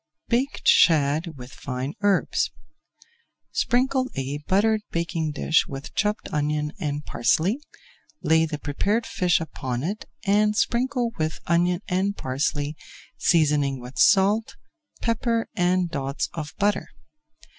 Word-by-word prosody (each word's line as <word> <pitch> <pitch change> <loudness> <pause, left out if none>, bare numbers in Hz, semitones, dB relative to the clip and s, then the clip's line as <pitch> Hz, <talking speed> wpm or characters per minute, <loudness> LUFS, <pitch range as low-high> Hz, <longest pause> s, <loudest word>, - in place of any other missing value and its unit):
BAKED 255 +4 0
SHAD 155 0 +4
WITH 125 0 -10
FINE 130 +2 -4
HERBS 205 -1 +2 1.0
Sprinkle 255 +1 +1
a 135 +2 -3
buttered 215 +3 +3
baking 170 -2 -2
dish 155 +2 +2
with 135 0 -7
chopped 210 +1 -1
onion 150 0 0
and 145 -1 -3
parsley, 185 - +1 0.6
lay 160 0 +4
the 155 -1 -4
prepared 200 +11 -1
fish 180 -1 +1
upon 130 -6 -4
it 200 +7 -3 0.2
and 210 +1 +3
sprinkle 245 0 +1
with 155 0 -1
onion 175 +2 +2
and 195 +2 0
parsley, 145 +3 -1 0.4
seasoning 145 -5 +2
with 125 +2 -9
salt, 205 +3 +4 0.5
pepper, 230 0 0
and 180 -1 +1
dots 140 -2 -2
of 150 -3 -6
butter. 205 0 +1
170 Hz, 120 wpm, -24 LUFS, 145-210 Hz, 1.0 s, SHAD